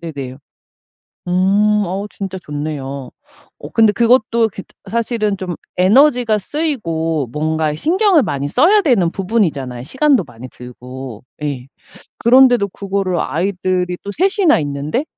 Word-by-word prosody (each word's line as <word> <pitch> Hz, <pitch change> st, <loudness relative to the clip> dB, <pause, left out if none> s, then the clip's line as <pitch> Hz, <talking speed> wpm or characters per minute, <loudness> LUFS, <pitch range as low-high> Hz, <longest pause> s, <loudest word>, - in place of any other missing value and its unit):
네네. 140 Hz, -6 st, -7 dB, 0.9 s
음 190 Hz, +3 st, +2 dB, 0.3 s
어 195 Hz, +3 st, -3 dB
진짜 190 Hz, -1 st, -6 dB
좋네요. 140 Hz, -3 st, -5 dB, 0.5 s
어 -, -, -9 dB
근데 220 Hz, -2 st, +4 dB
그것도 230 Hz, 0 st, +2 dB
그 195 Hz, -, -8 dB, 0.3 s
사실은 225 Hz, -3 st, -1 dB
좀 180 Hz, -2 st, -5 dB, 0.2 s
에너지가 235 Hz, +3 st, +4 dB
쓰이고 165 Hz, -, -2 dB
뭔가에 155 Hz, 0 st, -1 dB
신경을 365 Hz, -, +3 dB
많이 140 Hz, 0 st, -3 dB
써야 350 Hz, -, +4 dB
되는 225 Hz, -, +2 dB
부분이잖아요, 165 Hz, -, -1 dB
시간도 265 Hz, -, +2 dB
많이 120 Hz, +3 st, -11 dB
들고. 125 Hz, -1 st, -10 dB, 0.2 s
예. 135 Hz, -4 st, -4 dB, 0.5 s
그런데도 245 Hz, -3 st, +5 dB
그거를 195 Hz, -2 st, -2 dB
아이들이 180 Hz, +1 st, -1 dB
또 200 Hz, -, -5 dB
3 385 Hz, -, 0 dB
이나 335 Hz, -, +4 dB
있는데 145 Hz, -, -3 dB
185 Hz, 275 characters per minute, -17 LUFS, 150-235 Hz, 0.9 s, 그런데도